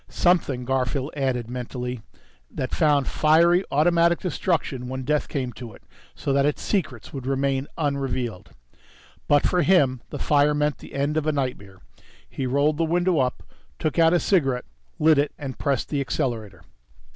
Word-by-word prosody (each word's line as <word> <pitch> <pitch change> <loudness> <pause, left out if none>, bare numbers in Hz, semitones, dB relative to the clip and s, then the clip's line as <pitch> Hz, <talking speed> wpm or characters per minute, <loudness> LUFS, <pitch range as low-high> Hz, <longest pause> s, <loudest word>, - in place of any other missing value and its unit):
Something, 145 -8 +1
Garfield 130 +2 -1
added 130 -5 -1
mentally, 125 0 -5 0.5
that 130 - -4
found 145 -5 +2
fiery 170 +4 +4
automatic 170 +3 +3
destruction 160 -8 -2
when 130 +1 -4
death 150 +3 0
came 130 -4 -3
to 115 0 -9
it, - - -19 0.3
so 140 - -2
that 140 0 +3
its 145 +1 -1
secrets 155 - -2
would 135 -2 -6
remain 135 0 0
unrevealed. 135 - -2 0.8
But 145 -1 +4
for 180 - +2
him 140 -10 +3
the - - -6
fire 150 0 +3
meant 150 0 0
the - - -12
end 145 +3 0
of 155 0 -1
a - - +3
nightmare. 125 -9 -4 0.5
He 130 - -4
rolled 140 +3 +1
the 165 - +1
window 175 0 +1
up, 125 -1 -1 0.3
took 155 +2 -1
out 165 0 +6
a 175 - +3
cigarette, 135 -11 +1 0.3
lit 155 -1 +4
it, 145 - 0
and 135 -3 -7
pressed 140 -4 -1
the 145 -2 -1
accelerator.... 115 -6 -3
140 Hz, 165 wpm, -24 LUFS, 130-155 Hz, 0.8 s, out